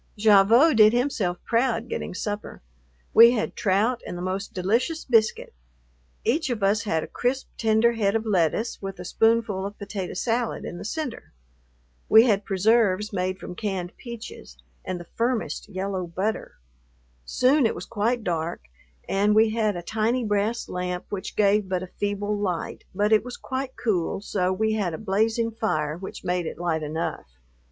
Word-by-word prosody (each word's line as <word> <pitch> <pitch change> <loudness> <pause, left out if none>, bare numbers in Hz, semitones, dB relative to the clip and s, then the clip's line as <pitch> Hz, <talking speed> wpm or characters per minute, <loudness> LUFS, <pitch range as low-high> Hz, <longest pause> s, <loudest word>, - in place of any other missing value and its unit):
Gavotte 220 +7 +5
did 215 0 +7
himself 235 -8 0
proud 235 -1 +1
getting 210 - -4
supper. 205 - -5 0.5
We 235 +1 +9
had 225 -3 -2
trout 220 +5 +1
and 175 - -5
the - - -6
most 190 +2 -3
delicious 230 - 0
biscuit. 225 -4 +2 0.7
Each 295 +3 +1
of 230 -5 -2
us 210 +3 +2
had 160 -6 0
a - - -6
crisp, 260 +2 -2
tender 225 +1 +3
head 215 -3 0
of 225 0 0
lettuce 205 +3 0
with 195 -1 -6
a 180 - -7
spoonful 225 -1 +1
of 200 +1 -6
potato 200 -3 -5
salad 230 +4 -1
in 175 - -6
the - - -8
center. 300 - -5 0.8
We 220 +1 +8
had 205 -4 +2
preserves 210 +1 +2
made 185 0 -1
from 185 - -8
canned 185 -3 -4
peaches, 235 -2 -9 0.3
and 185 -1 -4
the 175 - -9
firmest 230 +2 -2
yellow 190 -2 -3
butter. 190 +6 -3 0.7
Soon 255 - +3
it - - -3
was - - -7
quite 230 +2 -1
dark 165 - -2 0.5
and 205 +2 +2
we 220 0 +5
had 215 -3 0
a 175 - -6
tiny 225 +6 0
brass 210 +2 0
lamp 180 0 -4
which 200 -2 -5
gave 205 -1 +2
but 185 -1 -1
a - - -7
feeble 205 0 -1
light, 190 -5 -3
but 210 +2 +2
it 215 - +4
was 250 0 -7
quite 260 0 -4
cool 190 -8 0
so 185 -2 -1
we 220 +3 0
had 195 -6 -1
a - - -6
blazing 220 +3 0
fire 155 -9 -1
which 190 +3 -8
made 180 -2 -1
it - - -6
light 165 -2 -1
enough. 155 - -4
210 Hz, 170 wpm, -25 LUFS, 185-230 Hz, 0.8 s, We